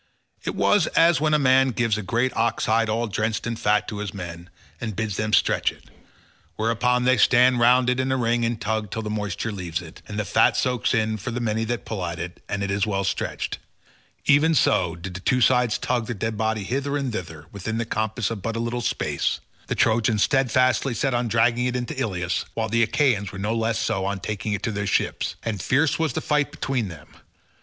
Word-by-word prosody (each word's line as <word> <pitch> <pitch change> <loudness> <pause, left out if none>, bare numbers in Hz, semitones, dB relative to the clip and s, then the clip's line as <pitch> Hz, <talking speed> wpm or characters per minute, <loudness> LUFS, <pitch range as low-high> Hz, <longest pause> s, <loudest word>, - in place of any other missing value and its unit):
It - - -3
was 205 - +3
as 165 -3 +5
when 155 -1 +3
a - - +5
man 130 -1 +4
gives 115 -3 0
a 110 - -3
great 120 +6 0
ox 115 +1 0
hide 115 0 +2
all 115 +2 0
drenched 110 +1 -2
in 120 0 -2
fat 105 -1 +1
to 105 - -5
his 105 -1 -5
men, 85 -2 -7 0.3
and 110 -4 -4
bids 110 -2 -2
them 110 +1 -2
stretch - - +3
it; - - -19 0.7
whereon 120 +3 +1
they 130 0 +4
stand 125 +2 +5
round 125 +1 +5
it 125 0 +1
in 130 0 0
a 130 - +1
ring 120 -1 +1
and 115 -1 -1
tug 110 -1 -2
till 110 +4 -4
the 105 - -4
moisture 105 +1 -3
leaves 90 -5 -4
it, 85 -1 -12
and 105 - -6
the 105 - -1
fat 110 +3 +3
soaks 125 -1 +1
in 110 -1 0
for 105 - -5
the 120 +1 -3
many 115 -1 -1
that 120 +1 -3
pull 105 -5 -4
at 85 0 -3
it, 85 0 -7
and 100 -1 -2
it 100 - -2
is 100 +2 0
well 100 -2 0
stretched—even 145 +9 -1
so 90 - +2
did 90 +2 -7
the 90 - -6
two 125 +6 +1
sides 125 -4 +3
tug 120 -3 -1
the 120 - -3
dead 110 +2 -2
body 110 0 -1
hither 140 +6 -1
and 135 -4 -3
thither 80 -7 -6
within 105 +3 -4
the 115 - -1
compass 110 0 -2
of 110 -4 -5
but 115 +3 -3
a - - -2
little 120 +1 -2
space—the 115 - -3
Trojans 110 -2 +2
steadfastly 130 -1 +2
set 135 +3 0
on 120 0 0
dragging 115 +2 +2
it 125 - -2
into 125 +4 -3
Ilius, 90 -9 -2
while 110 -1 -1
the 115 +2 +2
Achaeans 110 -5 +1
were 95 - -8
no 105 +4 -1
less 115 0 0
so 95 -4 -1
on 100 0 -2
taking 105 +1 -3
it 100 - -3
to 115 - -1
their 105 0 -3
ships; - - 0
and 105 -5 -3
fierce 145 - +2
was 160 -5 0
the - - -2
fight 150 -1 +1
between 130 -5 -2
them. 80 -5 -11
115 Hz, 225 wpm, -24 LUFS, 105-125 Hz, 0.7 s, as